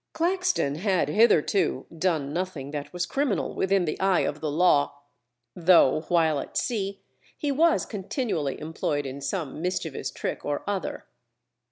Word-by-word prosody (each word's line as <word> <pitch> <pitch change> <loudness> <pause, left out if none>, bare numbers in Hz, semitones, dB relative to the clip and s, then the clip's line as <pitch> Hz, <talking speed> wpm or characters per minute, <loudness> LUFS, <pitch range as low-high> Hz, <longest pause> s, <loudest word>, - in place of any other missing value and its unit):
Claxton 360 - 0
had 185 -4 +1
hitherto 205 -1 +3
done 155 -5 0
nothing 170 -6 -3
that 145 -1 -5
was 180 0 -2
criminal 270 0 -1
within 190 -1 +1
the 155 - -3
eye 190 -1 +3
of 150 - -2
the 155 - -1
Law, 150 -2 +3 0.6
though 165 -5 +5
while 160 -4 +3
at - - -5
sea 200 -4 -2 0.3
he 295 -2 -1
was 320 +4 +3
continually 195 - -3
employed 150 -2 -2
in 135 +1 -6
some 155 -3 -3
mischievous 175 -7 -2
trick - - -4
or 145 0 -2
other. 200 -3 -3
175 Hz, 145 wpm, -26 LUFS, 150-200 Hz, 0.6 s, though